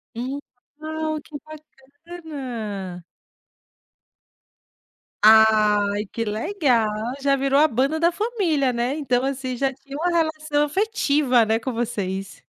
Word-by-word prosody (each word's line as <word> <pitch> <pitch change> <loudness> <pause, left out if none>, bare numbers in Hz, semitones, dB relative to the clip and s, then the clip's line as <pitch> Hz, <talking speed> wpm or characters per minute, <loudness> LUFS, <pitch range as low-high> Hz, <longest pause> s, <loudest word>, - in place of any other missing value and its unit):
Hum, 260 +4 -4 0.4
legal, 310 0 -3
que 305 - -14
bacana. 270 - -8 2.2
Ai 210 -2 +5
que 230 +2 -4
legal, 235 - +1 0.3
já 275 0 +3
virou 275 +1 +2
a 310 - +6
banda 275 +5 0
da 340 +1 +3
família, 340 - 0
né? 240 +3 -1
Então, 255 -5 0
assim, 265 -1 -3
já 270 +2 0
tinha 275 +1 -12
uma 335 +4 0
relação 310 -3 0
afetiva, 295 - +2
né, 220 +1 +1
com 260 - -4
vocês. 200 -5 -4
275 Hz, 115 wpm, -23 LUFS, 225-310 Hz, 2.2 s, a